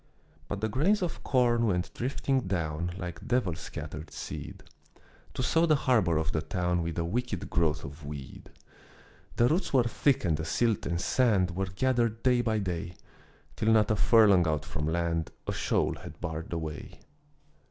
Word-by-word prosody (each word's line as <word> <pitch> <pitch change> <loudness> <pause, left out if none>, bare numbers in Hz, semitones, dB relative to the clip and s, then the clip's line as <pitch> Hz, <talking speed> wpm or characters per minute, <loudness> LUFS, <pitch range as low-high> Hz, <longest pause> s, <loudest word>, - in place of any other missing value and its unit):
But 100 - -4
the 110 - +1
grains 175 - +2
of 175 - -4
corn 120 -3 +2
went 90 -3 -1
drifting 135 +2 0
down 85 -2 -2
Like 95 +3 -7
devil 120 -8 +1
scattered 75 0 -7
seed, - - -7 0.7
To 130 - -1
sow 165 +6 +3
the 155 - +5
harbor 110 - +2
of 80 +1 0
the 80 - -1
town 90 +2 -1
With 85 -1 -4
a 85 - 0
wicked 105 +1 -3
growth 80 -4 +1
of 70 +2 -10
weed. 70 -2 -8 0.9
The 120 - +4
roots 165 +5 0
were 130 -3 +5
thick 125 +1 +1
and 80 -4 +2
the 80 - -4
silt 110 +7 0
and 85 0 -1
sand 100 -4 +2
Were 95 +1 -1
gathered 115 +3 0
day 125 -1 +4
by 110 -2 0
day, 90 -3 -3 0.6
Till 110 - +2
not 110 -1 +4
a - - +3
furlong 100 -5 +5
out 75 -2 -1
from 75 0 -3
land 85 -1 0 0.2
A - - -1
shoal - - +1
had - - -11
barred 80 0 -5
the 85 - -2
way. 80 -2 -7
95 Hz, 175 wpm, -29 LUFS, 85-120 Hz, 0.9 s, the